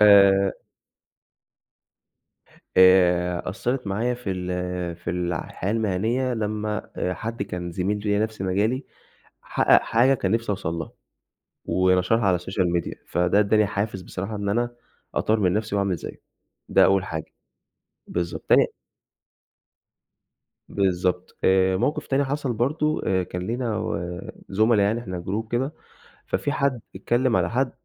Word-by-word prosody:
آآ 100 -2 +6 2.1
آآ 90 -1 +5
أثّرت 125 +5 -2
معايا 115 +5 0
في 120 -5 -5
ال 90 -1 -3
في 85 - -5
الع 90 -2 -2
الحياة 95 - -4
المهنية، 115 +4 0
لمّا 105 -1 -3
آآ 90 - -1
حد 115 +4 -4
كان 90 -3 -5
زميل 95 +4 -1
ليّا 105 0 0
نَفْس 110 -2 -8
مجالي، 105 +8 0 0.6
حقق - - +4
حاجة 125 +4 +3
كان 100 -7 -1
نِفْسي 115 0 0
أوصل 90 -5 -2
لها، 80 -2 -5 0.7
ونشرها 90 +4 +2
على 90 -2 +3
الSocial 95 +1 -1 0.2
Media - - -6
فده 90 +3 +2
إدّاني 105 +1 +4
حافز 100 -1 -3
بصراحة 95 +4 -5
إن 100 0 -3
أنا 120 +3 0 0.4
أطوّر 110 0 +1
من 90 -3 +3
نَفْسي 110 0 -1
وأعمل 100 -2 +1
زيّه، - - -9 0.5
ده - - +5
أول 95 0 +3
حاجة، 80 -3 -6 0.7
بالضبط. 85 0 -3
تاني - - +6 2.0
بالضبط. 90 -2 -1
آآ 95 0 +4
موقف 145 +10 -1
تاني 140 0 +1
حصل 140 -1 -2
برضه، 150 +7 0
آآ 95 -1 +2
كان 90 0 -5
لينا 115 -1 -2
و 90 -4 -3 0.3
زُملا 110 +2 +3
يعني 105 +4 +1
إحنا 90 -6 -6
group 110 +3 -2
كدا، 130 +4 0 0.6
ففي 145 - -1
حد 140 -4 0
اتكلم 120 +5 +1
على - - +2
حد 130 +2 0
100 Hz, 140 wpm, -24 LUFS, 90-115 Hz, 2.1 s, آآ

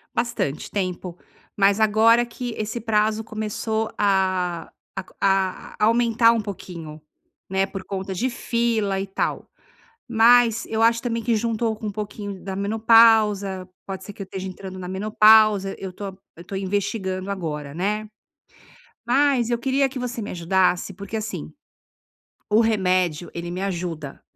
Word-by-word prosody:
Bastante 235 - -2
tempo, 185 -2 -3 0.4
mas 200 0 +4
agora 225 +3 +5
que 240 0 -6
esse 220 +2 -3
prazo 215 -1 +1
começou 220 0 -3
a 185 -4 0 0.3
a 190 0 -1
a - - -2
aumentar 230 0 +4
um 230 - +1
pouquinho, 170 -7 -7 0.5
né. 190 +1 +1
Por 195 -1 -7
conta 190 0 -4
de 240 +8 -1
fila 230 -4 0
e 195 - -2
tal. 195 - -3 0.6
Mas 235 0 +5
eu 220 0 -1
acho 230 0 +4
também 230 -2 -2
que 230 0 +1
juntou 225 0 -1
com 215 - -7
um - - -4
pouquinho 205 -1 -6
da 190 -1 -5
menopausa. 210 -3 +4 0.2
Pode 190 -1 -6
ser 205 - -9
que 200 - -7
eu - - -4
esteja 190 0 -6
entrando 185 0 -8
na 180 -1 -6
menopausa. 210 0 +4
Eu 190 -1 -5
estou 200 +2 -7 0.3
eu 170 - -12
estou 190 +2 -7
investigando 190 -1 -2
agora, 150 -7 -4
né. 210 +5 -2 1.0
Mas 270 -2 +3
eu 240 -1 0
queria 270 +3 +1
que 265 - -7
você 245 -1 -4
me 210 - -5
ajudasse, 180 +2 +1
porque 200 +4 -6
assim, 210 - -5 1.0
o 215 +2 +4
remédio, 185 -6 +1
ele 170 0 -5
me 180 +2 -4
ajuda, 170 -6 -4
205 Hz, 150 wpm, -23 LUFS, 190-225 Hz, 1.0 s, agora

